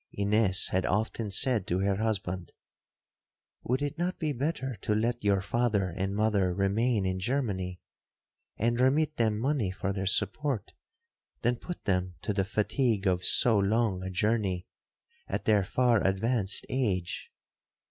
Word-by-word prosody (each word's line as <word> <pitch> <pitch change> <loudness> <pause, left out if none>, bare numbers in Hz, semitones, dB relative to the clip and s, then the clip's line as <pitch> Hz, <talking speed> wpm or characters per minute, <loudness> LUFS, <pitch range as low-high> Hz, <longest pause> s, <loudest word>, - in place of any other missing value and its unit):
Ines 100 -1 +4
had 95 0 0
often 110 +2 -1
said 110 0 +1
to 90 - 0
her 100 0 +1
husband, 95 -5 -3 1.1
'Would 130 +4 -1
it 145 +3 -3
not 180 +1 -1
be 155 -3 -1
better 135 0 -2
to 105 +2 -1
let 120 +2 -1
your 100 -2 +2
father 105 -2 0
and 95 +3 -3
mother 105 -3 +2
remain 100 +2 +1
in 95 0 -1
Germany, 95 -6 -2 0.8
and 115 +2 0
remit 150 +4 +2
them 110 -2 +1
money 130 -3 0
for 100 +1 -3
their 95 -1 -3
support, 110 +5 0 0.7
than 120 +1 +2
put 175 +6 -8
them 90 -2 0
to 105 - -1
the 100 -1 +1
fatigue 110 +1 0
of 90 -1 +1
so 115 -4 +4
long 100 -1 +1
a 95 - -4
journey 95 -2 0 0.6
at - - -3
their 105 -2 +4
far 120 +2 +2
advanced 100 +1 0
age?' 95 -10 -2
105 Hz, 145 wpm, -29 LUFS, 95-120 Hz, 1.1 s, Ines